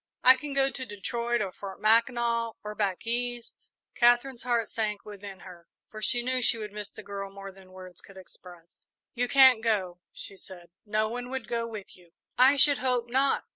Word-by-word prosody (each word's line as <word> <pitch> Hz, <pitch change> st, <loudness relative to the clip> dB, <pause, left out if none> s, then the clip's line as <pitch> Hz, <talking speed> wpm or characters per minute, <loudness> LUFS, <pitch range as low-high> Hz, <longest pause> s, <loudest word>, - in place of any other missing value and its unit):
"I 255 Hz, +1 st, +9 dB
can 285 Hz, +2 st, -6 dB
go 270 Hz, 0 st, +2 dB
to 260 Hz, -, -4 dB
Detroit, 235 Hz, +1 st, -2 dB
or 190 Hz, -, -4 dB
Fort 195 Hz, 0 st, -9 dB
Mackinac, 230 Hz, +1 st, +2 dB
or 210 Hz, 0 st, -5 dB
back 200 Hz, -2 st, -2 dB
East." 240 Hz, 0 st, -3 dB, 0.2 s
Katherine's 240 Hz, +1 st, +3 dB
heart 235 Hz, -2 st, 0 dB
sank 210 Hz, -2 st, -3 dB
within 200 Hz, -2 st, -10 dB
her, 175 Hz, -3 st, -13 dB, 0.2 s
for 215 Hz, -, -9 dB
she 240 Hz, +4 st, +1 dB
knew 255 Hz, +1 st, 0 dB
she 235 Hz, -, +2 dB
would 210 Hz, -2 st, -6 dB
miss 210 Hz, -1 st, -7 dB
the -, -, -12 dB
girl 200 Hz, -1 st, -6 dB
more 195 Hz, 0 st, -9 dB
than 190 Hz, -1 st, -18 dB
words 185 Hz, -1 st, -11 dB
could 195 Hz, -, -16 dB
express. 175 Hz, -2 st, -13 dB, 0.2 s
"You 245 Hz, 0 st, -1 dB
can't 260 Hz, -3 st, +6 dB
go," 190 Hz, -6 st, -1 dB
she 195 Hz, -, -8 dB
said; 175 Hz, -3 st, -12 dB, 0.2 s
"no 215 Hz, +1 st, +1 dB
one 245 Hz, +2 st, -5 dB
would 265 Hz, 0 st, -5 dB
go 230 Hz, -1 st, -2 dB
with 215 Hz, -4 st, -9 dB
you." 175 Hz, -2 st, -22 dB, 0.2 s
"I 260 Hz, +3 st, +6 dB
should 285 Hz, 0 st, +4 dB
hope 245 Hz, -2 st, -1 dB
not. 270 Hz, +2 st, +1 dB
225 Hz, 195 wpm, -28 LUFS, 195-245 Hz, 0.2 s, I